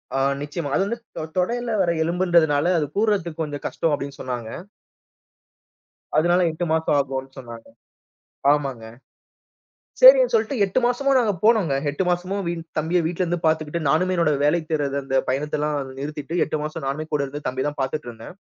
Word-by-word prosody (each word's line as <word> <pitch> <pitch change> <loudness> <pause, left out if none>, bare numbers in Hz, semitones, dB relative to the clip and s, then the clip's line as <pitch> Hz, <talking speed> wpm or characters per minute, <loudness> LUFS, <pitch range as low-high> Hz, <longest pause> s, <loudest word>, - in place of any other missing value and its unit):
ஆ - - +1 0.2
நிச்சயமா. 145 0 -4
அது 195 - +2
வந்து 235 +3 -3 0.2
தொ - - -3 0.2
தொடையில 235 +6 0
வர 170 -2 +2
எலும்புன்றதனால, 170 -3 +2
அது 150 - 0
கூட்றதுக்கு 195 -7 0
கொஞ்சம் 145 -2 -6
கஷ்டம். 165 - -1
அப்பிடீன்னு 140 -1 -4
சொன்னாங்க. 120 -3 -5 1.7
அதனால, 175 +3 +3
8 175 +2 -3
மாசம் 160 -2 +1
ஆகும்ன்னு 135 -1 -4
சொன்னாங்க. 120 -2 -10 0.8
ஆமாங்க. 135 -6 -1 1.2
சரின்னு - - +8
சொல்லிட்டு, 295 - +1
8 195 +6 0
மாசமும் 270 +2 +2
நாங்க 220 -4 +2
போனோங்க. 210 -11 +4 0.2
8 165 +6 -2
மாசமும் 185 +2 -2
வீன் 165 -1 -4
தம்பிய 165 +3 +1
வீட்லருந்து 175 0 -1
பார்த்துக்கிட்டு, 155 +1 0
நானுமே 185 +5 +2
என்னோட 160 -3 +2
வேலை 165 +3 +3
தேட்றது, 145 -3 -1
அந்த 135 0 -1
பயணத்தைலாம் 150 +2 -1 0.2
நிறுத்திட்டு, 150 +3 -4
8 155 - -2
மாசம் 155 -2 -5
நானுமே 155 +3 -3
கூட 145 -1 +1
இருந்து 145 +2 -8
தம்பிய 130 +2 -2
தான் 145 -1 -6
பார்த்துட்டு 135 0 -3
இருந்தேன். 115 +8 -11
155 Hz, 155 wpm, -23 LUFS, 145-180 Hz, 1.7 s, சரின்னு